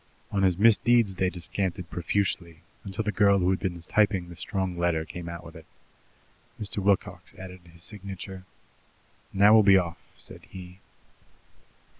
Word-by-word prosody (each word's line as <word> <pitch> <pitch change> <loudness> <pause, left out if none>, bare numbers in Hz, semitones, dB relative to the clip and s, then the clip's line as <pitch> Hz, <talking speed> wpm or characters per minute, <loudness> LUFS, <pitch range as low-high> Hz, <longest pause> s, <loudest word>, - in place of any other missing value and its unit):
On 100 - 0
his 95 -3 +3
misdeeds 115 0 +4
they 95 0 0
descanted 90 -1 -4
profusely, 85 -2 -2 0.2
until 100 +2 -4
the 105 - -1
girl 100 -1 +4
who 90 -1 +2
had 95 - 0
been 90 -3 -3
typing 95 0 +1
the 85 - -10
strong 95 +2 -3
letter 85 -2 0
came 85 +2 -8
out 85 0 -7
with 85 - -12
it. 80 - -13 0.9
Mr. 105 -1 -2
Wilcox 95 -3 -1
added 95 -1 -10
his 85 0 -6
signature. 95 -1 -7 0.9
"Now 100 +2 +5
we'll 110 - +8
be 100 -2 +6
off," 85 -2 -2 0.2
said - - -9
he. 90 0 -11
95 Hz, 155 wpm, -27 LUFS, 85-100 Hz, 0.9 s, we'll